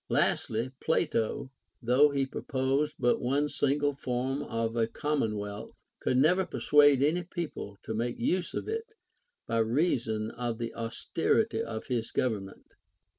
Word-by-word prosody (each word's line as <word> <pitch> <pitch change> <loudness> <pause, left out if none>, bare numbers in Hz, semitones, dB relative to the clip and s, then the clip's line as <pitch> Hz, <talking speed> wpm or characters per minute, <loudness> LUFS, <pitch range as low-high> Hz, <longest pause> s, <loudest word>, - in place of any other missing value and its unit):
Lastly, 115 +3 +1
Plato, 140 -4 0 0.3
though 130 +4 +5
he 140 -1 0
pro 135 - -6
posed 135 +3 0
but 120 -1 +2
one 140 +4 +1
single 145 +1 +1
form 130 +1 -2
of 115 0 -2
a 115 -1 +2
commonwealth, 110 -7 -3 0.2
could 125 - +1
never 175 +8 +4
persuade 145 -5 +4
any 160 +5 +2
people 170 - -6
to 110 - -4
make 120 +2 -2
use 175 +9 0
of - - -3
it, 445 0 -4 0.5
by 115 0 0
reason 115 -3 +1
of 120 -1 -3
the 115 -1 -4
aus 115 -1 -6
terity 225 +6 +2
of 110 - -5
his 120 -3 -2
government. 105 -6 -2
130 Hz, 145 wpm, -29 LUFS, 115-150 Hz, 0.5 s, though